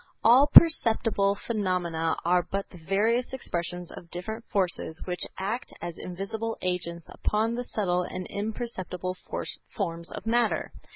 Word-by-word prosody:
All 250 +5 +7
perceptible 225 -11 +6
phenomena 180 -7 -1
are 180 +1 +4
but 195 +3 -4
the 180 - -12
various 220 +9 +1
expressions 175 -7 -4
of 170 - -11
different 220 +7 -5
forces 185 -5 -1
which 180 -2 0
act 210 +6 -3
as 170 0 -5
invisible 205 +5 -4
agents 170 -2 -2
upon 220 +2 0
the 245 +1 -2
subtle 185 -7 0
and 180 +1 -5
imperceptible 190 -4 -3 0.6
forms 170 -4 -3
of - - -7
matter. 235 0 +1
195 Hz, 130 wpm, -28 LUFS, 175-225 Hz, 0.6 s, All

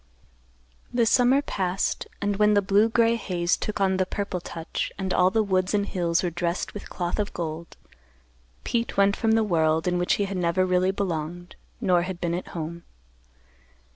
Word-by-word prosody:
The 240 -1 +2
summer 250 +4 +4
passed, 190 -6 -2 0.2
and, 205 -1 0
when 210 0 +4
the 205 - +4
blue 205 +3 +3
gray 230 0 +3
haze 175 -5 0
took 215 - -4
on 190 -1 +2
the 185 - +2
purple 200 -3 -3
touch 165 -1 -4
and 190 -1 -2
all 180 0 +4
the 220 +2 +1
woods 185 0 +1
and 200 -1 +1
hills 170 -3 0
were 175 - -1
dressed 175 +1 -2
with 205 - -8
cloth 175 +2 -3
of 205 - -2
gold, 165 0 -5 0.9
Pete 235 0 -2
went 200 0 +4
from 225 -1 +1
the 225 0 +3
world 160 -4 +1
in 180 0 +1
which 175 - +2
he 205 - 0
had 195 -1 -4
never 180 +1 +1
really 185 0 +2
belonged, 175 -2 -3 0.2
nor 185 -6 +3
had 180 0 -5
been 170 -1 -1
at 180 - -4
home. 170 +1 -5
185 Hz, 185 wpm, -25 LUFS, 175-205 Hz, 0.9 s, summer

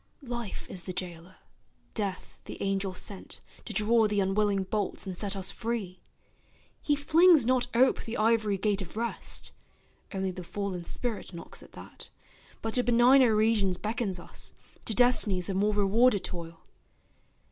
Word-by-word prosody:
Life 240 -4 -5
is 180 -3 -5
the 185 - -4
jailer, 175 0 -6 0.6
Death 200 -4 -4
the - - -8
angel 195 -1 -1
sent 190 +1 -4 0.3
To - - -6
draw 220 +2 +3
the 205 -1 0
unwilling 200 0 +1
bolts 205 +2 -2
and 190 -2 -4
set 200 +2 -2
us 190 0 -1
free. 220 -6 -4 0.8
He 295 - +2
flings 315 0 +5
not 255 0 +2
ope 255 +3 +3
the 230 - -5
ivory 215 -2 +2
gate 205 0 +1
of 190 +3 -8
Rest, 235 0 -2 0.6
Only 190 -1 -2
the 180 0 -8
fallen 185 -1 -4
spirit 215 -3 -4
knocks 170 - -5
at - - -16
that, - - -11 0.5
But 225 -1 -2
to 250 - +4
benigner 245 0 +5
regions 210 -4 +2
beckons 210 -3 -2
us, - - -6 0.3
To 220 - 0
destinies 215 -7 +4
of 190 - -2
more 205 +1 +1
rewarded 205 +2 +3
toil. 165 -2 -6
205 Hz, 155 wpm, -29 LUFS, 190-230 Hz, 0.8 s, flings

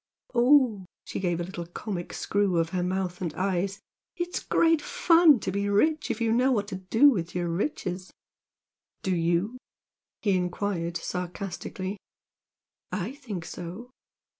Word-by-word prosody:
O 240 - +2
ooh!" 255 -2 +6
and 190 - -11 0.2
she - - -4
gave 175 -3 0
a 175 - -2 0.2
comic 175 0 -5
little - - -8
screw 200 -3 +1
of 165 -1 +1
her 180 +1 -1
mouth 180 0 -2
and 170 -3 -1
eyes 195 +1 -1 0.3
"It's 350 +1 -2
great 330 -2 +3
fun 330 -4 +5
to - - -2
be 200 +1 -1
rich 305 +10 +2
if 235 -1 -1
you 230 -1 +1
know 250 +3 +3
what 205 -5 +1
to 190 - -4
do 225 +10 +5
with 175 -7 -3
your 175 -1 0
riches!" 185 - -2 0.9
"Do 190 -1 +1
YOU?" 175 +8 0 0.6
he 200 -3 +3
enquired, 180 -1 -1
sarcastically. 185 +2 -4 0.9
"I 205 +4 -2
think 220 - -6
so!" 185 +12 -7
195 Hz, 155 wpm, -27 LUFS, 180-235 Hz, 0.9 s, ooh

